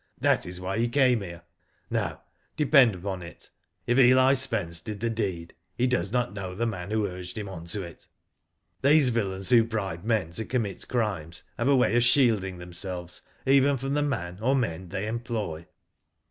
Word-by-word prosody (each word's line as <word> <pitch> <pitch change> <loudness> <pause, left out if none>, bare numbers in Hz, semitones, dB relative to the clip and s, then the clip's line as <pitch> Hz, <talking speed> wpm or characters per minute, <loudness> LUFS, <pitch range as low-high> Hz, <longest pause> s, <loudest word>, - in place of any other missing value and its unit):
That - - +2
is 90 0 -5
why 95 +4 -3
he 120 - +2
came 125 -3 +3
here. 85 -3 -8 0.5
No, - - -2 0.4
depend 135 -7 +5
upon 95 0 -5
it, 85 -1 -10 0.3
if 120 +2 +2
Eli 130 +1 +6
Spence 110 -11 -1
did 105 +2 -7
the 115 +2 -1
deed 95 -7 -3 0.2
he 125 - +2
does 105 -7 0
not 125 -2 0
know 95 -2 -6
the 115 - -1
man 95 -5 -4
who 110 -1 0
urged 90 0 -7
him 105 -1 -4
on 90 -4 -8
to^ 95 +3 -2
it. 85 -2 -11 0.7
These 140 -1 +5
villains 95 -5 -1
who 120 -2 +6
bribe 100 -7 -4
men 110 -7 0
to 110 +6 -3
commit 110 -7 -3
crimes 95 -10 -2
have 120 - -1
a 140 - +5
way 125 -2 +3
of 120 - +4
shielding 115 -7 +3
themselves 90 0 -6 0.2
even 140 +1 +4
from 135 +2 -3
the 145 - +1
man 90 -11 -3
or 130 +4 +2
men 90 -8 -2
they 95 +4 -3
employ." 110 -8 -4
105 Hz, 185 wpm, -27 LUFS, 90-125 Hz, 0.7 s, Eli